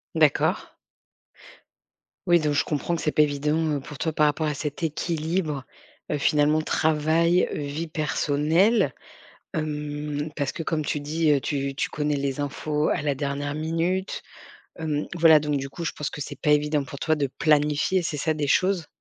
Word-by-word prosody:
D'accord. -, -, +2 dB, 1.5 s
Oui, 175 Hz, -2 st, +5 dB
donc 150 Hz, -1 st, +1 dB
je -, -, +2 dB
comprends 155 Hz, +3 st, -2 dB
que -, -, -5 dB
c'est 150 Hz, -, 0 dB
pas 150 Hz, -, +4 dB
évident, 150 Hz, +1 st, +1 dB, 0.2 s
heu, -, -, -3 dB
pour 145 Hz, +1 st, -10 dB
toi 160 Hz, +4 st, -1 dB
par 150 Hz, 0 st, +3 dB
rapport 155 Hz, +1 st, +1 dB
à 150 Hz, -, 0 dB
cet 150 Hz, +3 st, -5 dB
équilibre, 160 Hz, -2 st, -1 dB, 0.5 s
heu, -, -, +1 dB
finalement 150 Hz, +2 st, +3 dB
travail, 160 Hz, +3 st, +2 dB
vie 150 Hz, +3 st, -4 dB
personnelle, 155 Hz, +7 st, +2 dB, 0.6 s
hem, 150 Hz, -1 st, -3 dB
parce 140 Hz, -3 st, -1 dB
que 165 Hz, -, -5 dB
comme 155 Hz, -2 st, -1 dB
tu 150 Hz, 0 st, -1 dB
dis, 155 Hz, +2 st, 0 dB
heu, 140 Hz, -2 st, +4 dB
tu 140 Hz, -1 st, -2 dB
tu -, -, -1 dB
connais 150 Hz, -1 st, -1 dB
les 140 Hz, 0 st, -2 dB
infos 150 Hz, +1 st, -1 dB
à -, -, 0 dB
la 145 Hz, -1 st, 0 dB
dernière 145 Hz, +1 st, -3 dB
minute, 165 Hz, +5 st, -1 dB, 0.6 s
hem, 150 Hz, -2 st, -2 dB
voilà, 160 Hz, -2 st, +7 dB
donc 150 Hz, -1 st, -1 dB
du 135 Hz, 0 st, -3 dB
coup 170 Hz, +4 st, -6 dB
je -, -, -2 dB
pense 150 Hz, -, -3 dB
que -, -, -8 dB
c'est 145 Hz, -, -7 dB
pas 150 Hz, -, +2 dB
évident 150 Hz, -1 st, +2 dB
pour 135 Hz, +1 st, -9 dB
toi 155 Hz, -1 st, +1 dB
de 140 Hz, -2 st, 0 dB
planifier, 150 Hz, +4 st, +3 dB
c'est 160 Hz, -3 st, -3 dB
ça, 155 Hz, +3 st, 0 dB
des 150 Hz, -2 st, -2 dB
choses? 185 Hz, 0 st, +2 dB
150 Hz, 180 wpm, -25 LUFS, 145-160 Hz, 1.5 s, voilà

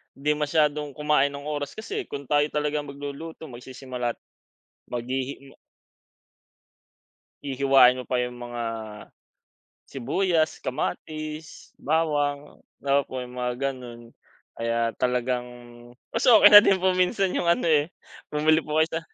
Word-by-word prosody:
di 145 Hz, +2 st, 0 dB
masyadong 150 Hz, -1 st, 0 dB
kumain 150 Hz, -2 st, +2 dB
ng 140 Hz, -, -8 dB
oras. 145 Hz, -1 st, -4 dB
Kasi 220 Hz, +1 st, -5 dB
kung 140 Hz, 0 st, -6 dB
tayo 145 Hz, 0 st, +3 dB
talaga 150 Hz, 0 st, -1 dB
magluluto, 145 Hz, +3 st, -8 dB
magsisimula 125 Hz, 0 st, -5 dB
at -, -, -43 dB, 0.7 s
maghihi 130 Hz, +3 st, -4 dB, 1.9 s
Hihiwain 135 Hz, -2 st, +5 dB
mo 125 Hz, -, -6 dB
pa 125 Hz, 0 st, -1 dB
yung 125 Hz, 0 st, -4 dB
mga 120 Hz, -1 st, -6 dB, 1.3 s
sibuyas, 155 Hz, +5 st, 0 dB
kamatis, 155 Hz, +4 st, -5 dB
bawang, 145 Hz, -2 st, -1 dB, 0.2 s
opo 140 Hz, -2 st, 0 dB
yung 125 Hz, -, -12 dB
mga 125 Hz, 0 st, -1 dB
ganun. 125 Hz, -3 st, -6 dB, 0.4 s
Kaya 115 Hz, 0 st, -1 dB
talagang 125 Hz, 0 st, 0 dB, 0.6 s
mas 230 Hz, +3 st, +1 dB
okey 230 Hz, -3 st, +8 dB
na 205 Hz, -, +13 dB
din 195 Hz, -2 st, +3 dB
po 185 Hz, 0 st, +2 dB
minsan 185 Hz, +1 st, +1 dB
yung 170 Hz, -, -1 dB
ano 170 Hz, -, +2 dB
eh 155 Hz, -2 st, +3 dB, 0.4 s
bumili 155 Hz, +1 st, +3 dB
po 150 Hz, -1 st, -4 dB
kayo 160 Hz, 0 st, +3 dB
sa 165 Hz, -, -1 dB
145 Hz, 125 wpm, -25 LUFS, 125-155 Hz, 1.9 s, na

